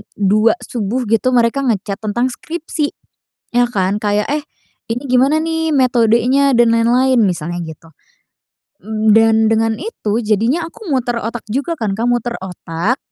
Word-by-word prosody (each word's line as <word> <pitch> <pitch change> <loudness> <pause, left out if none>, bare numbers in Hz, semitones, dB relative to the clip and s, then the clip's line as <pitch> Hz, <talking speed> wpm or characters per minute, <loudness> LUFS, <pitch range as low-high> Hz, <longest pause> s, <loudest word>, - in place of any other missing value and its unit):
2:00 215 +3 +3
subuh 235 +2 -3
gitu 230 +3 +2
mereka 240 +3 +2
nge-chat 205 -4 -1
tentang 240 +4 -1
skripsi 310 0 -4 0.7
ya 245 - +4
kan 195 -2 0
kayak, 210 0 0
eh, 295 0 -1 0.5
ini 245 - -4
gimana 260 +4 +3
nih 325 0 -1
metodenya 250 +2 +3
dan 235 -1 +4
lain-lain 245 +2 +3
misalnya 175 -3 -1
gitu. 160 +1 -11 0.9
Mmm, 215 0 +1
dan 225 0 +5
dengan 225 0 +2
itu, 225 - -3
jadinya 230 - +1
aku 370 +2 -10
muter 245 -3 0
otak 230 +1 -5
juga 280 +9 -3
kan, 210 -4 -1
Kak, 230 +4 -2
muter 240 0 -1
otak 180 - -3
230 Hz, 145 wpm, -17 LUFS, 210-260 Hz, 0.9 s, dan